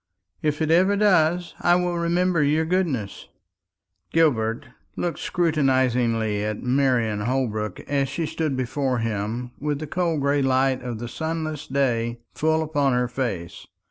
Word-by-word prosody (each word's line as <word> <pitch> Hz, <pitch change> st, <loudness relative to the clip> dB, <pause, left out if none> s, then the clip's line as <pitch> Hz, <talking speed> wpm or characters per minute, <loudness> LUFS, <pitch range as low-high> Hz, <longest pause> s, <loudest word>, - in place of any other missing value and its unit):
"If 150 Hz, +1 st, 0 dB
it 155 Hz, -, 0 dB
ever 185 Hz, +4 st, +4 dB
does, 180 Hz, -4 st, +2 dB
I 175 Hz, -, +4 dB
will 180 Hz, -1 st, 0 dB
remember 170 Hz, 0 st, +1 dB
your 150 Hz, +2 st, +2 dB
goodness." 160 Hz, -, -1 dB, 0.8 s
Gilbert 115 Hz, -9 st, +2 dB, 0.3 s
looked 175 Hz, -1 st, -2 dB
scrutinisingly 125 Hz, -, +1 dB
at 105 Hz, 0 st, -3 dB
Marian 125 Hz, -5 st, +1 dB
Holbrook 110 Hz, -4 st, -2 dB
as 140 Hz, -2 st, -1 dB
she 160 Hz, +4 st, -2 dB
stood 155 Hz, -3 st, -2 dB
before 130 Hz, 0 st, -1 dB
him 115 Hz, +2 st, -3 dB
with 150 Hz, 0 st, -1 dB
the 155 Hz, -, -5 dB
cold 165 Hz, -1 st, -1 dB
gray 140 Hz, +1 st, +2 dB
light 130 Hz, 0 st, +2 dB
of 120 Hz, -2 st, -5 dB
the 120 Hz, +2 st, -5 dB
sunless 160 Hz, +1 st, -4 dB
day 120 Hz, -4 st, 0 dB
full 160 Hz, +1 st, +1 dB
upon 145 Hz, -4 st, +1 dB
her 125 Hz, 0 st, +1 dB
face. 115 Hz, -9 st, -4 dB
140 Hz, 140 wpm, -24 LUFS, 120-160 Hz, 0.8 s, ever